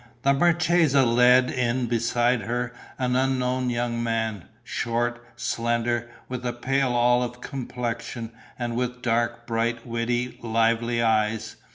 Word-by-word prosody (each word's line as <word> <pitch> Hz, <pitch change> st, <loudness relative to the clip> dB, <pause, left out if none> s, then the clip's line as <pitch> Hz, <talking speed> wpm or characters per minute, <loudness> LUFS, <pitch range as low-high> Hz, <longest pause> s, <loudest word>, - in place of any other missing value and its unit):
The 140 Hz, -, +4 dB
marchesa 165 Hz, -3 st, +3 dB
led 125 Hz, +2 st, +5 dB
in 125 Hz, 0 st, 0 dB
beside 120 Hz, +1 st, +1 dB
her 120 Hz, +3 st, -2 dB, 0.2 s
an 125 Hz, -1 st, 0 dB
unknown 130 Hz, -1 st, +1 dB
young 120 Hz, -1 st, -1 dB
man, 110 Hz, -5 st, -2 dB, 0.2 s
short, 120 Hz, +1 st, -2 dB
slender, 120 Hz, 0 st, -1 dB, 0.2 s
with 125 Hz, -1 st, -5 dB
a 120 Hz, -1 st, -1 dB
pale 130 Hz, +1 st, 0 dB
olive 120 Hz, 0 st, +2 dB
complexion 120 Hz, -3 st, -5 dB, 0.3 s
and 120 Hz, -1 st, -3 dB
with 125 Hz, 0 st, -3 dB
dark, 115 Hz, 0 st, 0 dB
bright, 115 Hz, 0 st, -1 dB
witty, 120 Hz, +1 st, -2 dB
lively 115 Hz, +1 st, +1 dB
eyes. 110 Hz, -1 st, 0 dB
120 Hz, 125 wpm, -25 LUFS, 115-125 Hz, 0.3 s, led